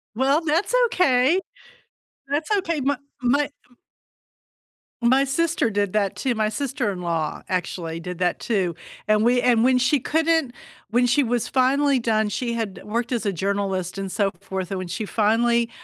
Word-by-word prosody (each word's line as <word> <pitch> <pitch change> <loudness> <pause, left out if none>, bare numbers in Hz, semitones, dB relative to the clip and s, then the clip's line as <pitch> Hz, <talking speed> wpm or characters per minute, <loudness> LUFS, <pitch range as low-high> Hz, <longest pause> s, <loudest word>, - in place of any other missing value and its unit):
Well, 275 +5 +2
that's 330 +8 0
okay. 315 - +3 0.9
That's 290 +5 -2
okay. 335 -6 -1
My 280 +1 +1 0.2
my 280 +4 +2
m - - -12 1.5
my 260 +3 +4
sister 330 0 +1
my - - -3
did 205 -1 -1
that 200 -2 0
too, 260 -3 -1
my 215 -1 0
sister-in-law 200 - -2
actually, 170 -2 -3
did 180 0 -6
that 180 -1 0
too. 190 -7 -1 0.3
And 215 0 +3
we 245 +1 +3
and 235 -2 +3
when 255 0 +4
she 260 +3 +2
couldn't 320 -4 +1 0.4
when 245 +2 +3
she 245 +4 +3
was 240 -1 -1
finally 270 +1 +2
done, 220 -2 +1
she 235 +2 -2
had 225 -4 -4
worked 235 +4 -3
as 235 -3 -1
a 200 - 0
journalist 195 0 -2
and 195 -1 -4
so 200 0 +1
forth, 190 -1 -5
and 195 - -2
when 185 - -5
she 185 +5 -4
finally 230 +3 +2
235 Hz, 165 wpm, -23 LUFS, 200-270 Hz, 1.5 s, my